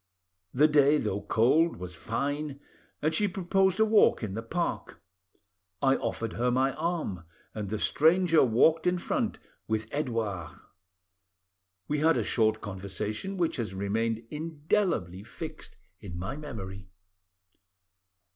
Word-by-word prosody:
The 150 +4 +5
day, 150 0 +5
though 105 -6 -2
cold, 125 +11 +3
was 90 0 -7
fine, 140 - -3 0.4
and 155 +1 +2
she 205 +6 +2
proposed 190 +1 +1
a 220 - +6
walk 215 - +4
in 100 -3 -3
the 110 - -3
park. 170 +10 -3 0.8
I 135 +4 +3
offered 115 -1 -3
her 125 +2 0
my 130 +2 +2
arm, 155 - -3 0.3
and 105 -3 -4
the 110 - -2
stranger 165 - +4
walked 155 +8 +3
in 180 0 +2
front 220 +5 -1 0.3
with 110 0 -1
Edouard. 115 - -2 1.3
We 150 0 0
had 160 +2 +4
a - - +1
short 110 -2 +1
conversation, 105 - -4
which 165 -3 0
has 105 -6 -3
remained 110 +3 -1
indelibly 150 - -1
fixed 155 +9 -9 0.2
in 90 -5 -8
my 95 +9 -4
memory. 100 -10 -8
130 Hz, 130 wpm, -29 LUFS, 105-160 Hz, 1.3 s, a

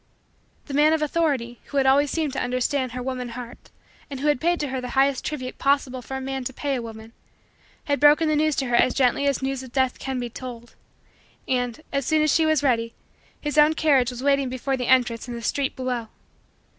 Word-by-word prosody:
The 285 - -8
man 300 +2 +4
of 315 -1 +1
authority, 280 -7 -1
who 285 - -5
had 270 - +3
always 280 +2 +4
seemed 310 -3 -1
to - - -2
understand 255 +1 -1
her 250 0 -4
woman 255 -1 -4
heart 240 0 -9 0.4
and 275 -2 -6
who 295 +2 +1
had 290 -4 +1
paid 345 +1 +1
to 295 - -2
her 260 -1 -3
the 250 - -5
highest 270 0 +3
tribute 255 -4 -5
possible 275 -2 +1
for 265 +2 -6
a - - -4
man 265 0 -4
to 265 - -2
pay 285 +2 -2
a 255 - -1
woman, 225 0 -10 0.7
had 285 -2 0
broken 295 +2 +5
the 310 - +2
news 305 0 +2
to 270 - -1
her 245 -1 0
as 250 - +3
gently 265 +1 +2
as 275 -1 0
news 270 -1 -2
of 260 -2 -11
Death 260 -1 0
can 265 -1 -3
be 245 - -3
told, 240 0 -9 0.7
and, 245 +1 -1
as 275 -2 -1
soon 310 -1 +3
as 305 - +3
she 320 -1 +3
was 310 -2 +2
ready, 230 -4 +1 0.4
his 295 0 0
own 300 +1 +5
carriage 275 -7 +3
was 250 0 -7
waiting 275 -2 +2
before 260 +2 -2
the 250 -2 -3
entrance 245 -2 +2
in 240 - -5
the 235 - -6
street 275 +4 -1
below. 250 -3 -3
265 Hz, 230 wpm, -24 LUFS, 250-290 Hz, 0.7 s, broken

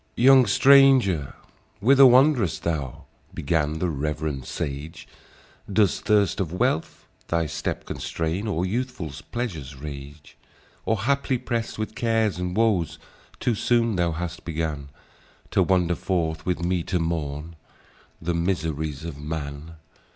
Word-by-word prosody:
"Young 130 0 +6
stranger, 130 - +5 0.4
whither 135 +5 +7
wand'rest 125 - +4
thou?" 75 -6 -3 0.3
Began 75 +1 0
the 90 - -1
rev'rend 75 -2 -3
sage; 70 +3 -5 0.6
"Does 100 -1 +2
thirst 105 -3 +2
of 90 -5 -2
wealth 90 - -1 0.2
thy 85 -1 0
step 75 - -4
constrain, 85 +6 -3
Or 90 -3 -1
youthful 120 - -3 0.2
pleasure's 85 - -4
rage? 70 +1 -10 0.5
Or 110 -3 +1
haply, 140 +1 +1
prest 120 -2 -3
with 110 0 -4
cares 110 -5 0
and 90 +1 -3
woes, 105 -8 +1 0.4
Too 120 - +1
soon 115 0 +1
thou 85 -2 +1
hast 85 +1 -5
began 80 -4 -3 0.6
To - - +3
wander 90 -2 +2
forth, 80 -3 -2
with 90 -1 -1
me 90 0 0
to 90 - 0
mourn 80 -1 -3 0.6
The 85 +2 -2
miseries 80 -4 -2
of 80 -4 -7
man. 75 +1 -6
85 Hz, 130 wpm, -24 LUFS, 80-110 Hz, 0.6 s, whither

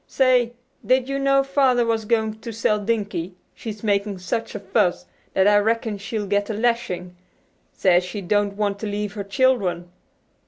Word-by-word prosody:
Say, 250 -3 +3 0.3
did 255 0 +2
you 275 0 -1
know 275 0 +3
Father 270 -3 +2
was 225 -1 0
going 220 -1 0
to 230 +1 -7
sell 215 -1 +1
Dinkie; 200 -5 -2 0.2
she's 215 -2 -8
making 200 -1 0
such 185 +6 -3
a - - -3
fuss 195 -2 0 0.3
that 190 +1 +4
I 205 0 +6
reckon 220 -1 0
she'll 215 0 -3
get 205 +1 0
a 220 - -2
lashing; 210 -6 -1 0.6
says 180 -1 +3
she 180 +3 -5
don't 205 +1 0
want 200 -1 -1
to 215 - -4
leave 205 0 -3
her 205 -1 -4
children." 200 -6 +1
210 Hz, 170 wpm, -23 LUFS, 200-235 Hz, 0.6 s, I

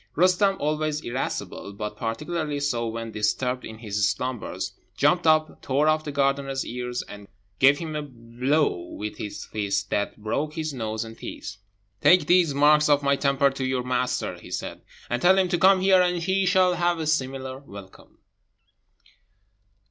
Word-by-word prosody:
Roostem, 185 +3 +3
always 150 0 -1
irascible, 120 -5 -4
but 105 +1 -5
particularly 150 +7 -3
so 120 -5 -1
when 115 0 -5
disturbed 125 +4 -1
in 110 - -8
his 105 -3 0
slumbers, 125 +4 -4 0.2
jumped 165 +4 +3
up, 155 0 +2
tore 140 +3 +1
off 155 0 +2
the 150 - -4
gardener's 140 -1 0
ears, 125 0 -4
and 105 -1 -11 0.3
gave 135 +1 +6
him 160 -1 -5
a 150 - -1
blow 130 +3 -1 0.2
with 105 0 -6
his 105 - -6
fist 100 -1 -2
that 100 - -1
broke 140 +9 -3
his 155 -2 -3
nose 110 -3 -3
and 115 0 -11
teeth. 100 - -7 0.4
"Take 180 +8 +6
these 175 -3 +4
marks 150 +1 +5
of 145 -1 +4
my 140 0 +3
temper 140 0 +2
to 135 0 -5
your 130 -1 -1
master," 125 0 -1
he - - -13
said, - - -5 0.3
"and 120 0 -2
tell 190 +2 +5
him 185 -1 +2
to 175 -1 0
come 190 +1 +5
here, 190 -1 +5
and 180 0 +1
he 190 +2 0
shall 185 0 +4
have 175 0 +1
a 160 - -3
similar 135 -3 -2
welcome." 100 -8 -13
140 Hz, 170 wpm, -25 LUFS, 115-155 Hz, 0.4 s, gave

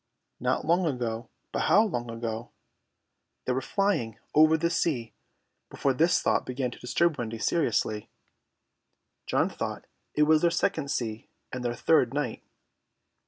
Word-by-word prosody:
Not - - 0
long 170 +2 +3
ago. 120 -4 -3 0.2
But - - -1
how 210 - +6
long 120 - -3
ago? 115 0 -4 1.0
They 130 - +1
were 130 - -1
flying 130 - 0 0.2
over 155 +1 +6
the 170 +1 0
sea 130 -9 -1 0.6
before 135 - 0
this 165 +7 +3
thought - - +2
began 125 -1 -3
to - - -11
disturb 160 +4 +1
Wendy 115 -1 -3
seriously. 110 -6 0 1.2
John - - +2
thought - - -5 0.3
it 150 - +4
was 155 0 +4
their 170 - +4
second 160 -3 0
sea 115 -5 -3 0.2
and 125 -1 -4
their 120 -1 -1
third 135 -4 +3
night. 145 -6 -2
130 Hz, 145 wpm, -28 LUFS, 115-160 Hz, 1.2 s, how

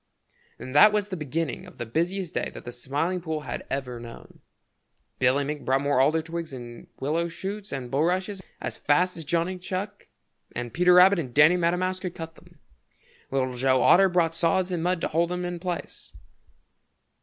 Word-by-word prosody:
And 130 - -8
that 210 +9 +8
was 210 -1 0
the 190 - -3
beginning 155 0 -3
of - - -15
the 120 - -4
busiest 170 - -2
day - - -1
that - - -9
the 120 - -5
Smiling 145 +9 -2
Pool 160 -2 -3
had - - -6
ever 125 -3 -3
known. 115 0 -12 0.8
Billy 130 +3 +3
Mink 150 +1 -4
brought 135 +1 +2
more 140 -2 +2
alder 155 +4 +3
twigs 165 -1 -5
and 120 -2 -9
willow 160 +5 0
shoots 195 +4 -6
and 130 -3 -5
bulrushes 185 +7 0 0.2
as - - -4
fast 180 +5 +2
as 165 - -7
Johnny 170 +4 -1
Chuck 195 +3 -5 0.5
and 120 -1 -4
Peter 180 +1 +5
Rabbit 185 +1 +7
and 130 -7 -5
Danny 150 +4 +7
Meadow 175 0 +1
Mouse 185 +1 -1
could 180 -2 -5
cut 165 -1 -7
them. - - -20 0.7
Little 130 -1 -1
Joe 130 +1 +2
Otter 190 +1 +6
brought 170 -2 +2
sods 175 +3 +1
and 175 -2 -1
mud 180 0 0
to - - 0
hold 165 +2 +1
them 180 0 -3
in 175 -1 -4
place. 175 -1 -5
165 Hz, 190 wpm, -26 LUFS, 135-180 Hz, 0.8 s, that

